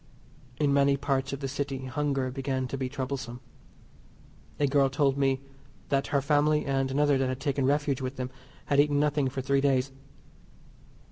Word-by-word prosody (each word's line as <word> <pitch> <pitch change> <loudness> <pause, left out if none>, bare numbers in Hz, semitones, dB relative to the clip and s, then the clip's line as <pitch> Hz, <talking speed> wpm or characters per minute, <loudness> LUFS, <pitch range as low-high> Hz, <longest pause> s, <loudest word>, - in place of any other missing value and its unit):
In 145 -2 +2
many 140 0 +4
parts 135 -1 -1
of 140 +1 -5
the 135 - -2
City 135 -1 -3
hunger 135 -1 -1
began 135 -1 -2
to - - -3
be 130 -1 -3
troublesome. 130 -2 -4 1.2
A 145 - +3
girl 140 -1 +3
told 135 0 +2
me 135 -1 +1 0.5
that 140 -1 +1
her 140 -2 0
family, 150 +1 +2
and 135 -1 0
another 145 0 +2
that 130 -1 +1
had 130 0 -3
taken 140 -1 0
refuge 145 -2 +1
with 130 +1 -4
them, 125 -1 -4 0.3
had 140 - +2
eaten 145 0 +4
nothing 145 -2 +1
for 135 +1 -4
three 135 +1 +1
days. 135 -1 +2
135 Hz, 175 wpm, -28 LUFS, 130-145 Hz, 1.2 s, many